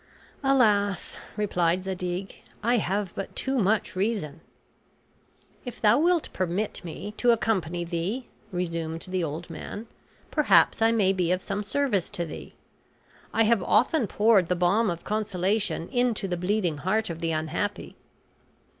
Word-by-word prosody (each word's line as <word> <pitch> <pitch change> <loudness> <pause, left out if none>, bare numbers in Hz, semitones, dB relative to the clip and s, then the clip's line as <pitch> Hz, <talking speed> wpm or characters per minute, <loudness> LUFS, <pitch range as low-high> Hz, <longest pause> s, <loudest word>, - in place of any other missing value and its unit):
"Alas," 210 -8 +2 0.2
replied 180 -3 +1
Zadig, 185 0 -4 0.2
"I 240 +2 +3
have 195 -2 -1
but 195 - -6
too 265 -1 -1
much 210 -1 +1
reason." 185 -7 -2 1.2
"If 245 -2 -8
thou 220 +4 +5
wilt 345 0 +2
permit 185 +4 -2
me 180 +4 -7
to 245 - +2
accompany 190 -7 +1
thee," 175 +9 -3 0.2
resumed 165 -2 -3
the 185 -1 -1
old 165 +3 -5
man, 205 +7 -7 0.5
"perhaps 300 -6 +4
I 225 0 +5
may 200 -4 +3
be 180 -2 0
of 185 0 0
some 205 0 -2
service 210 -3 0
to 170 - -1
thee. 160 - -9 0.8
I 225 - +3
have 225 -2 +3
often 235 - +3
poured 205 -4 +4
the 180 - +1
balm 195 +6 +2
of 170 -1 -4
consolation 205 -3 -1
into 245 -5 0
the 180 - -1
bleeding 180 -3 0
heart 215 +4 0
of 165 - -6
the 165 0 -1
unhappy." 160 +6 -2
195 Hz, 145 wpm, -26 LUFS, 175-220 Hz, 1.2 s, thou